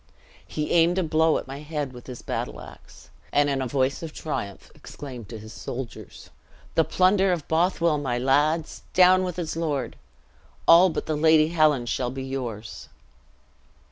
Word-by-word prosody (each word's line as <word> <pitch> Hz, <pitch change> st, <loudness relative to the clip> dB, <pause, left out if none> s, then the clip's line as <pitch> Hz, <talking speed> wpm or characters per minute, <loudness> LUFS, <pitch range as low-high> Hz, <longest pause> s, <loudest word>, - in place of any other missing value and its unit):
"He 150 Hz, -1 st, -3 dB
aimed 170 Hz, +1 st, +4 dB
a 190 Hz, -, +2 dB
blow 160 Hz, 0 st, +2 dB
at -, -, -5 dB
my 135 Hz, +2 st, -8 dB
head 150 Hz, -3 st, -4 dB
with 120 Hz, -1 st, -12 dB
his 125 Hz, -2 st, -8 dB
battle -, -, -4 dB
ax, -, -, -14 dB, 0.2 s
and 145 Hz, 0 st, +3 dB
in 135 Hz, -1 st, -1 dB
a 130 Hz, -, -2 dB
voice 135 Hz, +1 st, 0 dB
of 165 Hz, -2 st, -6 dB
triumph 100 Hz, -10 st, -5 dB
exclaimed 125 Hz, -7 st, -10 dB
to 115 Hz, -, -7 dB
his 110 Hz, +1 st, -11 dB
soldiers, 120 Hz, -2 st, -8 dB, 0.4 s
'The 165 Hz, -, +3 dB
plunder 190 Hz, +1 st, +3 dB
of 170 Hz, -5 st, -2 dB
Bothwell, 165 Hz, -1 st, +1 dB
my 130 Hz, -4 st, -2 dB
lads! 145 Hz, +5 st, +1 dB
Down 185 Hz, 0 st, +6 dB
with 180 Hz, -1 st, -4 dB
its 165 Hz, -3 st, -3 dB
lord! 145 Hz, -7 st, -2 dB, 0.7 s
All 175 Hz, +3 st, +8 dB
but -, -, -4 dB
the 155 Hz, -, -1 dB
lady 155 Hz, 0 st, +4 dB
Helen 155 Hz, -6 st, +3 dB
shall 120 Hz, +1 st, -1 dB
be 130 Hz, +1 st, -6 dB
yours!" 120 Hz, -5 st, -6 dB
150 Hz, 170 wpm, -25 LUFS, 130-165 Hz, 0.7 s, All